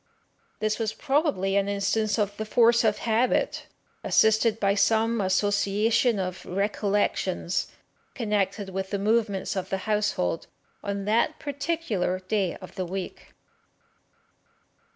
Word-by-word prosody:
This 215 +1 -1
was 220 -1 -1
probably 275 - 0
an 200 0 +2
instance 205 +2 0
of 205 -2 0
the 220 - -2
force 235 +2 +4
of 215 -2 +2
habit, 235 - 0 0.4
assisted 220 0 +3
by 200 -1 +2
some 225 +2 +2
association 205 +4 +2
of 185 -1 -4
recollections 195 -2 -1 0.5
connected 205 -3 -1
with 190 0 -4
the 200 - -1
movements 210 -1 0
of 190 -1 -3
the 190 -1 -3
household 210 - 0 0.4
on 200 -1 -3
that 235 +9 +1
particular 285 - -2
day 185 0 -1
of 185 - -11
the 185 -3 -3
week." 190 +1 -7
205 Hz, 120 wpm, -26 LUFS, 195-225 Hz, 0.5 s, force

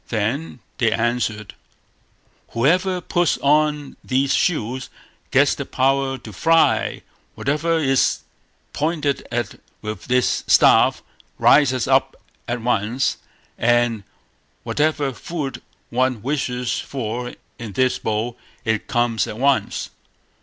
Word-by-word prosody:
Then 120 +5 -2 0.2
they 115 -3 +3
answered 115 -3 -1 1.0
"Whoever 180 +9 +2
puts 175 -1 +1
on 150 0 +1
these 135 +1 +1
shoes 130 -6 0 0.4
gets 140 0 +4
the 140 - -4
power 135 0 +1
to 115 -4 -11
fly; 165 - +2 0.3
whatever 155 +4 0
is 135 -4 +2 0.5
pointed 150 -2 -1
at 120 -4 -3 0.2
with 110 0 -5
this 125 -1 +1
staff - - +5 0.3
rises 130 -5 +4
up - - +2 0.3
at 120 -1 -3
once; 120 +2 0 0.4
and 120 -2 +2 0.6
whatever 150 -2 0
food 150 -1 -5 0.3
one 125 -2 0
wishes 125 -3 -1
for 120 -1 -4 0.2
in 115 -4 -7
this 130 +4 +1
bowl, 110 +2 -2 0.3
it 110 -2 -1
comes 120 -2 +1
at 105 - -6
once." 130 -5 0
130 Hz, 110 wpm, -21 LUFS, 115-145 Hz, 1.0 s, staff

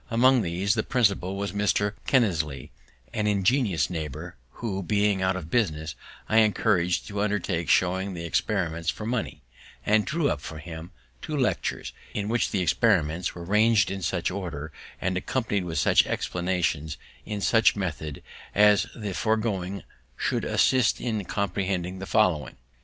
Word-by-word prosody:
Among 125 +2 +4
these, 95 +2 0
the - - +1
principal 100 -6 +1
was 100 +1 -3
Mr. 105 0 +1
Kinnersley, 80 - +1 0.4
an 105 - 0
ingenious 105 - +2
neighbour, 80 -6 -5 0.2
who, 100 -5 -3
being 100 +1 +1
out 95 0 +1
of 85 -3 -6
business, 80 -9 0 0.3
I 110 - +2
encouraged 90 -5 +2
to 100 0 -2
undertake 100 -5 -1
showing 95 +1 +2
the 85 0 -5
experiments 85 -2 -1
for 105 - -3
money, 115 - -3 0.4
and 105 0 +4
drew 155 +3 0
up 70 - -3
for 80 - -7
him 80 +1 -8 0.3
two 155 -2 -4
lectures, 130 - -1 0.2
in 105 0 -2
which 120 +1 +1
the 95 - 0
experiments 85 -3 +1
were 85 - -7
rang'd 105 0 +3
in 95 0 -4
such 80 - -1
order, 80 -6 -5 0.3
and 95 0 -1
accompanied 105 -2 -1
with 80 -2 -4
such - - +4
explanations 85 -4 -1 0.3
in 105 -1 -4
such 110 +4 +4
method, 80 -7 -4 0.3
as 105 -3 +5
that - - -10
the 100 -2 -3
foregoing 100 -3 -1 0.3
should - - -1
assist 130 -4 +3
in 110 -4 -2
comprehending 95 -2 -2
the 95 - -6
following. 90 - +2
95 Hz, 150 wpm, -26 LUFS, 85-105 Hz, 0.4 s, as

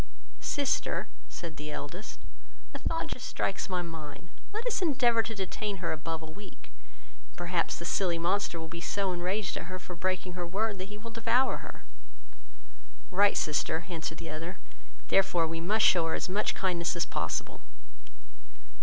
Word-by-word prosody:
"Sister, 280 - +1 0.2
said 165 -3 -6
the 150 +1 -5
eldest, 170 +7 -5 0.6
a - - -4
thought 330 - +1
just - - -4
strikes - - -1
my 180 -1 +1
mind; 160 -1 -7 0.2
let 435 +3 -3
us 485 -5 +2
endeavour 250 -8 +5
to 225 0 -4
detain 200 +1 -2
her 175 - -1
above 160 +1 -2
a - - -4
week, 175 -5 -11 0.6
and - - -24
perhaps 175 -1 +1
the 170 - -6
silly 175 -1 +2
monster 175 0 +1
will 160 - -4
be 170 +1 -6
so 195 +1 +1
enraged 180 +2 0
at - - -3
her 185 +1 -4
for 180 0 -8
breaking 185 +1 -1
her 175 -1 -3
word, 205 +2 0
that 185 - -3
he 210 - -7
will 230 +2 -8
devour 235 +3 +3
her." - - -9 1.3
"Right, 200 +2 +5
sister, 155 +2 +1
answered 165 -2 -3
the 165 - -5
other, 165 +4 -4 0.5
therefore 180 -3 +5
we 165 +1 -2
must 210 +6 +4
shew 170 -3 +6
her 165 - +1
as - - -1
much 200 +3 +1
kindness 175 -2 +1
as 170 - +2
possible." 85 - -2
180 Hz, 170 wpm, -31 LUFS, 165-205 Hz, 1.3 s, shew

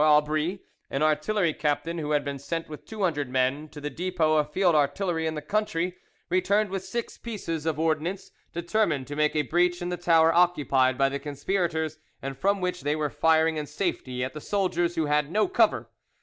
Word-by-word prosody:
Aubry, 155 +4 +2 0.3
an 135 +2 -1
artillery 155 +3 +2
captain 160 +3 -1
who 150 -1 -3
had 145 -1 +1
been 140 -1 -4
sent 165 +4 -4
with 150 -1 -10
two 215 -2 -4
hundred 145 -7 0
men 130 +4 0
to 150 - -10
the 145 0 -4
depot 170 -3 +1
of 150 0 0
field 180 +1 +3
artillery 160 +3 +1
in 160 - -2
the 150 - -5
country, 180 -4 -1 0.3
returned 195 +3 +2
with 195 -1 -3
six 235 +3 -5
pieces 165 -9 -4
of 160 -2 0
ordnance, 165 +4 -1 0.2
determined 170 -5 0
to 145 - -6
make 150 0 +1
a 150 - +2
breach 175 +5 +2
in 175 -1 -3
the 180 - -2
tower 165 -1 +4
occupied 145 -7 +3
by 135 - +4
the 140 +1 -3
conspirators, 160 +1 -2 0.2
and 135 0 -5
from 200 +3 +1
which 180 0 -2
they 145 +1 0
were 150 -2 -1
firing 160 +1 +3
in 150 -1 -3
safety 130 -10 -2
at 130 - -4
the 150 - -7
soldiers, 175 -3 0
who 160 -2 +1
had 150 0 +1
no 215 +3 +2
cover. 370 - +2
160 Hz, 200 wpm, -27 LUFS, 150-180 Hz, 0.3 s, tower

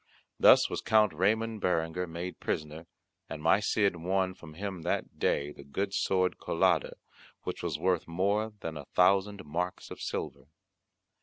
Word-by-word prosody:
Thus - - +7
was - - -4
Count 105 -4 +4
Ramon 110 +6 +1
Berenguer 90 -1 0
made 85 +2 -6
prisoner, 75 +2 -4 0.4
and 75 - -5
my 80 +6 +4
Cid 100 -3 +1
won 95 +2 0
from 80 -4 -13
him 95 -1 -5
that - - -3
day 70 +1 +1
the 70 - -12
good 95 +8 -3
sword 95 -2 +1
Colada, - - +1 0.5
which - - -4
was 85 -4 -2
worth 90 +1 0
more 100 +6 0
than 80 -1 -5
a 70 - -8
thousand 100 +3 +2
marks 90 +5 -4
of - - -8
silver. - - -4
90 Hz, 155 wpm, -30 LUFS, 80-100 Hz, 0.5 s, Thus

